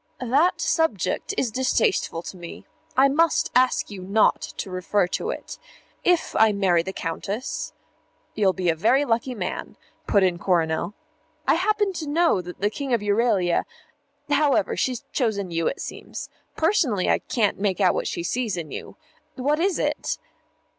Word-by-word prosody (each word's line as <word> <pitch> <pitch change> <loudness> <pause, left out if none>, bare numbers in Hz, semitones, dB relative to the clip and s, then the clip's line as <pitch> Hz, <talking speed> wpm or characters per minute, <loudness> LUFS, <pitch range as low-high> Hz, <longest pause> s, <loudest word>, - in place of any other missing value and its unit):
"That 290 +9 +3
subject 320 - 0
is 240 - 0
distasteful 260 - +1
to - - -7
me. 175 -2 -10 0.3
I 270 +1 +7
must 325 +4 +2
ask 255 -3 +2
you 195 -2 -7
not 200 +4 +3
to 190 - -6
refer 185 +2 +1
to 445 - -2
it. - - -6 0.4
If 355 -2 +2
I 220 -1 +6
marry 190 -4 +3
the 190 +3 -5
Countess 195 - -4 0.3
" - - -41
"You'll 200 -3 +3
be 180 -1 -1
a - - -3
very 235 - +3
lucky 240 +1 0
man," 185 -4 -5 0.3
put 200 - +4
in 180 -2 +1
Coronel. 170 +1 0 0.5
"I - - +5
happen 410 +2 +1
to 315 -4 -5
know 325 - +3
that 180 +1 -10
the 205 +1 +2
King 270 0 -1
of 230 - -2
Euralia 205 -4 +2 0.6
however, 290 -1 +2
she's 255 -3 -1
chosen 200 -8 -1
you, 165 -1 0
it - - -2
seems. - - -7 0.3
Personally, 310 - +2
I - - +3
can't 210 -6 0
make 200 -2 0
out 185 -3 +4
what - - -2
she 170 - -3
sees 225 +1 -1
in 160 -3 -5
you. - - -7 0.4
What 290 +4 0
is 370 +1 +1
it?" - - -1
220 Hz, 165 wpm, -24 LUFS, 185-280 Hz, 0.6 s, I